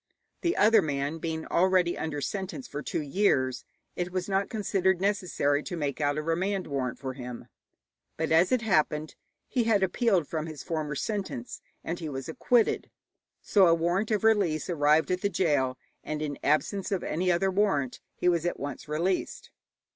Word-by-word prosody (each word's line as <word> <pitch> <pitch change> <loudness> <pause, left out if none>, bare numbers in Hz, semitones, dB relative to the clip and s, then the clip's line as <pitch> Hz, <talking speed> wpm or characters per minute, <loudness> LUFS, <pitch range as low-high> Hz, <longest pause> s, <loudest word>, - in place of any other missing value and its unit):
The 345 0 0
other 220 +2 +6
man 145 +1 -2
being 160 -1 -3
already 180 -1 +2
under 150 -2 -3
sentence 195 - -4
for 145 - -5
two 150 - -3
years, 135 -6 +1 0.3
it 180 0 -3
was 185 0 -2
not 195 0 0
considered 190 -4 +1
necessary 180 -7 +1
to 175 +2 -5
make 145 -1 -2
out 145 0 +1
a 155 - -2
remand 185 +4 -1
warrant 130 -4 -2
for 130 -1 -5
him. 125 -2 -8 0.7
But, 160 0 -1
as 165 +3 +4
it 250 -2 +2
happened, 155 -6 +1 0.3
he 245 -3 0
had 210 -4 +3
appealed 190 - +2
from 160 -1 -3
his 155 -3 -7
former 155 -3 -3
sentence 220 - -4 0.2
and 170 +1 -3
he 160 -3 -4
was 135 -2 -5
acquitted, 230 +8 +1 0.5
so 195 -3 +5
a 165 - +5
warrant 175 +6 0
of 215 -1 0
release 190 -8 +2
arrived 155 +1 +3
at 180 0 0
the 200 - +1
gaol, 145 -9 +1 0.3
and, 155 0 -3
in 150 -2 -4
absence 185 +7 +1
of 195 - -1
any 180 +3 0
other 190 +3 +2
warrant, 185 -10 +1 0.2
he - - -1
was 170 -2 +3
at 175 - -2
once 140 0 -6
released. 170 +5 -2
170 Hz, 175 wpm, -28 LUFS, 150-195 Hz, 0.7 s, other